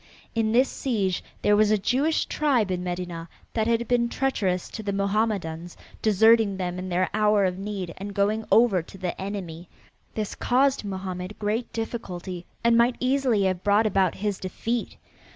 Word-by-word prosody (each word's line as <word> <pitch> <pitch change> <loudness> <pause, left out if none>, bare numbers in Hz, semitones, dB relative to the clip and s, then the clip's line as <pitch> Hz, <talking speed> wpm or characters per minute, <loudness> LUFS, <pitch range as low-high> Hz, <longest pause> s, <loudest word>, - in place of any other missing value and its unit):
In 225 -1 +1
this 255 +4 +4
siege 205 -11 -1 0.2
there 205 - +5
was 210 0 +4
a 215 - +4
Jewish 270 +10 +1
tribe 255 -10 +1
in 180 -1 -2
Medinah 175 -2 -4 0.3
that 220 -1 0
had 235 0 +1
been 240 -1 +2
treacherous 200 -10 -1
to 220 - -6
the 205 -1 -2
Mohammedans, 195 -5 -1 0.2
deserting 220 -1 +4
them 180 -1 -3
in 185 0 -5
their 185 +1 +1
hour 210 -1 +3
of 185 0 -2
need, 195 -4 -4
and 200 +1 -7
going 210 +2 +1
over 225 -6 +5
to 170 - -13
the 180 -1 -4
enemy. 180 -4 -6 0.5
This 215 -2 -3
caused 265 +1 +2
Mohammed 190 -1 -5
great 220 +3 -2
difficulty 185 -6 -5 0.2
and 235 0 +4
might 235 +1 +4
easily 255 -5 +2
have 185 -1 0
brought 205 +2 +3
about 190 -4 +2
his 205 -1 -2
defeat. 225 +5 -3
205 Hz, 170 wpm, -25 LUFS, 185-230 Hz, 0.5 s, there